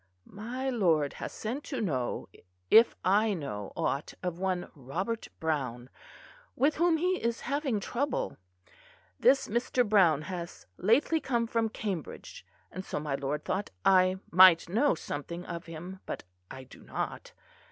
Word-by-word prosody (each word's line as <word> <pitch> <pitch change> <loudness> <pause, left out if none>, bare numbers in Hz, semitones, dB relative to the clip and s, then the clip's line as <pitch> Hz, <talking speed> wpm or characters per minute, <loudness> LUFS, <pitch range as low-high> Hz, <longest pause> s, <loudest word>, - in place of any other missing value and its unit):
"My 240 +6 -5
lord 165 - +2
has - - -4
sent 250 +7 -4
to 265 - -4
know 135 - -2 0.4
if 230 +1 +7
I 205 +3 +3
know 105 - -5
aught 140 - -2
of 180 -1 -3
one 185 -2 -2
Robert 175 - -4
Browne, 130 -6 -2 0.6
with 285 +3 +2
whom 340 0 +3
he 365 +3 0
is 235 0 -1
having 275 -4 -1
trouble. 255 +6 -2 0.8
This 270 - +4
Mr. 240 +2 +1
Browne 175 -8 +4
has 175 0 -7
lately 250 - +3
come 240 -5 0
from 230 -1 0
Cambridge, 195 -7 -6 0.3
and 185 - -6
so - - -4
my 150 -2 -3
lord 140 +2 -2
thought 200 +2 -2 0.2
I 185 0 +5
might 180 -2 +8
know 230 +9 +2
something 170 +3 -6
of 170 0 -6
him; 175 +4 -8
but - - -5 0.3
I 130 0 -8
do 130 - -15
not. - - -5
190 Hz, 145 wpm, -30 LUFS, 160-235 Hz, 0.8 s, might